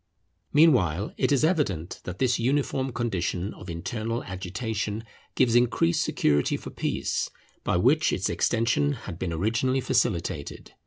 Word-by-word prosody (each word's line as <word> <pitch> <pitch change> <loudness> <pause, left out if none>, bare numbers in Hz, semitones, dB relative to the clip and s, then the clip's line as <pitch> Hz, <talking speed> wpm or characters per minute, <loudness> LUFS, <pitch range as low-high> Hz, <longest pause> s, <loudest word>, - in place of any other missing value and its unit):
Meanwhile 110 - +4
it - - +1
is 140 0 +3
evident 140 - 0
that 90 0 -5
this 125 +1 +1
uniform 135 +1 0
condition 100 -5 -2
of 95 - -11
internal 110 +7 -3
agitation 100 +4 -4 0.3
gives 125 -3 +3
increased 120 -8 +3
security 75 -1 +1
for - - -9
peace, - - -1 0.3
by - - +1
which 140 - +3
its 95 - 0
extension 115 +6 +1
had 95 -9 -8
been 90 - -2
originally 115 +10 +1
facilitated. 85 - -1
110 Hz, 135 wpm, -26 LUFS, 90-130 Hz, 0.3 s, Meanwhile